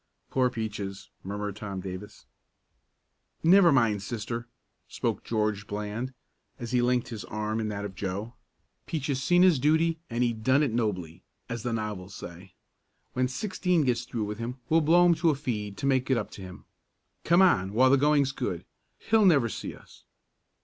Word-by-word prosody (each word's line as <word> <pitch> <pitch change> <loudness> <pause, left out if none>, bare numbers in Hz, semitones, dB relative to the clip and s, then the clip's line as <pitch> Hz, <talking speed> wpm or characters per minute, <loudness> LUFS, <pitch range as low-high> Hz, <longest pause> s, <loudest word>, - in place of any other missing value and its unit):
"Poor 130 -1 +3
Peaches!" 105 -4 -5
murmured 100 +1 -4
Tom 100 -3 -5
Davis. 95 +2 -8 1.2
"Never 175 +1 +7
mind, 115 -7 +3
Sister," 115 +3 -4 0.4
spoke - - -2
George 105 -2 -1
Bland, 105 +5 -4 0.5
as 120 -3 -6
he 125 -1 +3
linked 125 0 +1
his 110 -3 -6
arm 105 +1 -3
in 110 - -1
that 105 -1 -4
of 100 - -6
Joe. 100 +4 -4 0.5
"Peaches 140 -4 -2
seen 175 +6 +4
his 180 -7 +5
duty 160 +3 +2
and 120 +1 0
he 120 -1 +1
done 130 +6 +2
it 140 - 0
nobly, 90 -7 -2 0.3
as 115 -1 -4
the 120 - -2
novels 105 -4 -4
say. 90 +2 -10 0.6
When 125 0 +1
Sixteen 180 - 0
gets 120 -3 +1
through 115 -2 -3
with 105 +1 -5
him 120 +2 -4
we'll 165 +1 +4
blow 170 +3 +5
him 175 - +6
to 165 0 +2
a 150 - +2
feed 105 -8 -4
to 135 - -4
make 130 -1 +2
it 130 - +3
up 105 - -3
to - - -10
him. 90 -1 -10 0.6
Come 170 +3 +5
on 95 - +3
while 130 +5 +4
the - - +7
going's 145 -1 +3
good. - - -4 0.3
He'll 220 -2 +3
never 140 -9 +4
see - - -6
us." - - -18
120 Hz, 175 wpm, -28 LUFS, 105-140 Hz, 1.2 s, Never